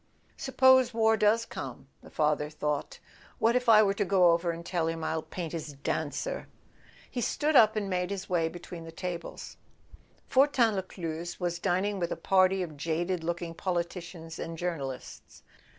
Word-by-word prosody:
"Suppose 260 -2 +4
war 225 -1 +4
does 220 +2 +3
come," 130 0 -7
the - - -14
father 150 -1 +1
thought, 150 -1 -3 0.4
"what 230 +2 +3
if 250 -1 +1
I 215 -1 +8
were 195 -1 +2
to 205 - 0
go 185 -3 +5
over 170 +1 +1
and 170 0 -4
tell 175 -2 -1
him 165 0 -3
I'll 160 0 -1
paint 170 0 -6
his 155 -3 -5
dancer?" 145 - -3 0.6
He 245 - -2
stood 300 +6 0
up 220 -3 +7
and 210 -2 -1
made 180 -1 -1
his 195 -1 -4
way 165 -3 +1
between 175 0 -9
the 165 - -9
tables. 170 0 -6 0.7
Fortin 260 -4 +4
Lescluze 175 -3 -5
was 175 -1 -2
dining 195 +3 0
with 170 -1 -2
a - - 0
party 190 0 +3
of 155 -4 -8
jaded 165 +3 -1
looking 170 0 -3
politicians 170 -2 -4
and 165 0 -5
journalists. 145 -7 -6
175 Hz, 165 wpm, -29 LUFS, 165-205 Hz, 0.7 s, I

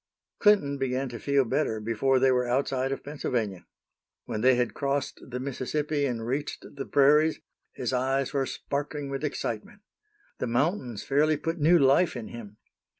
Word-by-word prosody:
Clinton 170 -10 +4
began 130 0 -1
to 120 -1 -7
feel 140 +1 +2
better 120 -3 0
before 115 +5 +1
they 130 0 +4
were 125 -1 +1
outside 130 +1 0
of 135 - -4
Pennsylvania. 115 -9 -3 0.6
When 110 - -3
they 130 +1 +5
had 120 -3 0
crossed 140 +1 -2
the 125 0 -4
Mississippi 140 +2 -1
and 115 -3 -3
reached 135 +5 -3
the 140 - -5
prairies, 150 +3 +4 0.3
his - - -3
eyes 135 +2 0
were 135 -2 0
sparkling 145 0 -4
with 135 +2 -4
excitement. 140 - -4 0.6
The - - -1
mountains 125 - -1
fairly 150 +2 +2
put 165 +3 -3
new 165 +4 +5
life 140 +4 +4
in 120 -3 -6
him. 105 -3 -10
135 Hz, 160 wpm, -27 LUFS, 125-145 Hz, 0.6 s, they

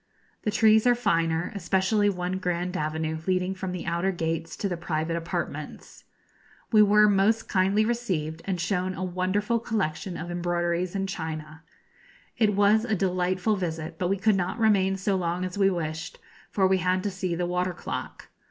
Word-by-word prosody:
The - - -1
trees 220 +2 +4
are 245 - +5
finer, 165 -7 0
especially 200 +2 +1
one 180 -1 -2
grand 180 0 -2
avenue 160 0 -2
leading 185 0 +1
from 190 -1 -5
the 180 -1 -5
outer 170 +3 0
gates 165 -2 -3
to 200 - -1
the 180 - -2
private 165 -1 -2
apartments. 170 0 -5 0.7
We 215 -2 +6
were 210 0 +6
most 205 +3 +2
kindly 195 +3 +2
received, 180 -10 -2
and 190 -3 -2
shown 185 +2 -1
a 185 - -4
wonderful 185 +5 0
collection 195 -6 -2
of 175 +1 -6
embroideries 175 +1 -1
and 195 0 -1
china. 160 -3 -6 0.7
It 210 -3 +2
was 205 +2 +4
a 220 -3 0
delightful 185 +2 0
visit, 165 -3 -4
but 180 - 0
we 195 - +1
could 210 +2 +3
not 185 +3 -1
remain 200 -4 +3
so 195 +1 0
long 180 0 -1
as 185 - -5
we 195 -1 +4
wished, 165 -3 -4 0.3
for 195 - +1
we 190 0 +3
had 185 +1 +1
to 205 - -1
see 185 -2 -2
the 175 +1 -1
water 180 +1 -1
clock. - - -6
185 Hz, 175 wpm, -26 LUFS, 170-200 Hz, 0.7 s, We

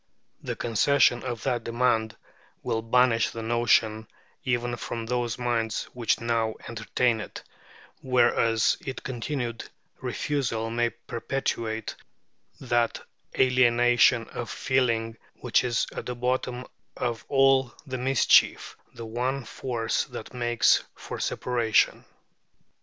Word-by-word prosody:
The - - -4
concession 120 +2 +3
of 120 -4 -5
that 120 -3 -1
demand 115 -2 0 0.5
will 110 - -1
banish 115 0 +3
the 115 - -7
notion 115 -2 +2 0.4
even 120 -1 -1
from 115 -1 -5
those 120 -1 -1
minds 115 -3 -1
which 120 -3 0
now 115 -1 0
entertain 115 +1 0
it, - - -9 0.6
whereas 120 -3 +3
its 135 -4 -6
continued 120 -2 -4 0.4
refusal 115 -6 -2
may 120 0 +1
perpetuate 115 -1 -3 0.7
that 120 -3 0 0.4
alienation 120 -2 +4
of 120 - -6
feeling 115 -4 0 0.2
which - - +1
is 120 -2 0
at - - -5
the 125 - -3
bottom 125 0 -2 0.3
of 120 -2 -2
all 135 -2 +4
the 130 -3 -5
mischief, 130 0 +3 0.2
the 115 -1 -7
one 125 +3 -2
force 115 -1 -2
that 120 -2 -9
makes 120 -1 +3
for - - -7
separation. 120 -3 +1
120 Hz, 115 wpm, -26 LUFS, 115-125 Hz, 0.7 s, alienation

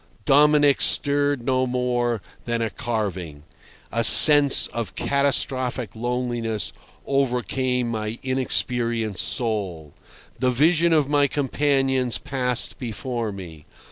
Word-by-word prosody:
Dominic 145 0 +3
stirred 145 -2 +2
no 130 0 -1
more 120 -3 -3 0.2
than 120 -1 -3
a 115 -2 -3
carving. 95 - -6 0.5
A 115 - -2
sense 145 +3 +8
of 115 -5 -7
catastrophic 130 -5 -2
loneliness 120 -2 -4 0.3
overcame 125 -2 -2
my 110 0 -5
inexperienced 120 -5 -1
soul. 95 - -4 0.5
The 130 - 0
vision 160 +6 +1
of 155 -4 +1
my 145 -1 +1
companions 135 -2 -1
passed 125 -2 -2
before 120 -1 -5
me. 85 -6 -12
125 Hz, 105 wpm, -21 LUFS, 115-135 Hz, 0.5 s, sense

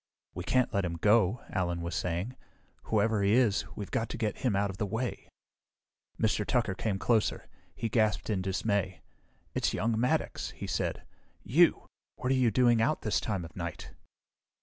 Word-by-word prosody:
"We 90 - -5
can't 125 +6 +1
let 100 -2 +1
him 85 -2 -2
go," 105 +4 +3
Allen 85 -3 -1
was 85 +1 -4
saying. 90 +8 -2 0.5
"Whoever 110 0 +2
he 100 +1 +3
is, 115 -4 +3
we've 100 - -6
got 115 0 -1
to - - -5
get 110 -3 -2
him 120 -6 +1
out 100 0 +1
of 95 - -11
the 105 - -1
way." 115 +5 -3 0.9
Mr. 110 -1 +2
Tucker 120 -2 +1
came 100 +1 -2
closer. 110 +1 +1 0.3
He 115 - -2
gasped 110 -2 +1
in 105 -4 0
dismay. 95 0 -1 0.5
"It's - - 0
young 110 0 0
Maddox," 125 +2 0
he - - -5
said. - - -2 0.4
"You! 165 - +4 0.3
What 125 - -2
are - - +4
you 125 -2 +4
doing 120 0 +4
out 140 +7 +1
this 105 - +1
time 95 -6 -2
of 80 - -12
night?" 85 -2 -6
105 Hz, 175 wpm, -30 LUFS, 95-115 Hz, 0.9 s, You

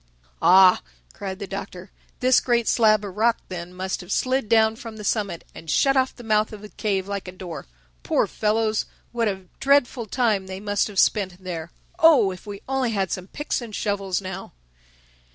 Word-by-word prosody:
"Ah," 185 0 +7 0.3
cried 190 -1 -6
the 200 - -5
Doctor, 190 -1 -7 0.3
"this 255 0 +5
great 235 -2 +1
slab 215 -3 +4
of 190 -2 -7
rock 230 +2 +3
then 175 -1 -6
must 185 +1 -4
have 180 +2 -10
slid 255 -2 0
down 220 -1 +4
from 225 -1 -9
the 210 - -8
summit 200 -5 -1
and 160 - -11
shut 275 - +3
off 260 -1 +1
the 245 - -11
mouth 215 -1 +2
of 210 -1 -10
the 210 - -9
cave 195 -4 -2
like 200 -1 -4
a - - -5
door. 180 - -8 0.3
Poor - - +1
fellows! 215 0 0 0.2
What 235 -1 0
a 190 -2 -3
dreadful 270 -4 +2
time 215 -5 +1
they 190 0 -6
must 205 0 0
have 205 -2 -10
spent 195 -3 +3
in 185 - -24
there!—Oh, 190 - +2
if 185 +3 -11
we 200 -1 -7
only 265 -2 0
had 195 -3 -1
some 185 0 -4
picks 295 +4 -3
and 225 -3 -7
shovels 200 -3 -1
now!" 190 0 -7
205 Hz, 190 wpm, -24 LUFS, 190-230 Hz, 0.3 s, Ah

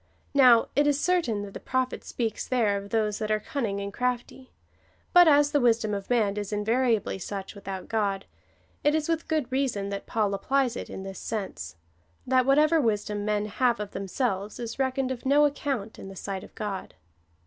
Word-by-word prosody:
Now 250 -5 +6
it 290 +1 +4
is 290 -1 +2
certain, 295 - +1
that 200 -1 -8
the - - -6
Prophet 260 0 -1
sjieahs 225 -3 -3
there 230 -5 +2
of 200 0 -5
those 215 -2 0
that 215 -1 -2
are 215 0 +2
cunning 215 -5 -3
and 200 0 -5
crafty; 250 +2 -3 0.6
but 355 -1 +8
as 290 -1 +5
the 290 - +3
wisdom 225 -3 +2
of 200 -1 -4
man 215 -5 +2
is 205 -1 -4
invariably 220 0 +1
such 195 +1 -6
without 195 -2 -7
God,^ 200 -3 0 0.6
it 295 +1 +3
is 310 -1 0
Avith 325 -1 -1
good 305 -6 -1
reason 255 -7 0
that 200 0 -5
Paul 210 -3 0
applies 255 +5 +1
it - - -6
in 190 - -7
this 195 0 -7
sense, 195 - -5 0.3
— 85 0 -39
that 255 0 +3
whatever 305 +3 +5
wisdom 210 -3 -1
men 210 0 0
have 235 +3 +1
of 210 -1 -5
themselves 200 0 -2
is 235 +1 -5
reckoned 260 0 0
of 250 -2 -5
no 285 +2 +5
account 275 -7 -2
in - - -8
the 195 - -10
sight 190 0 -5
of - - -14
God. 205 -3 -5
225 Hz, 195 wpm, -27 LUFS, 200-265 Hz, 0.6 s, but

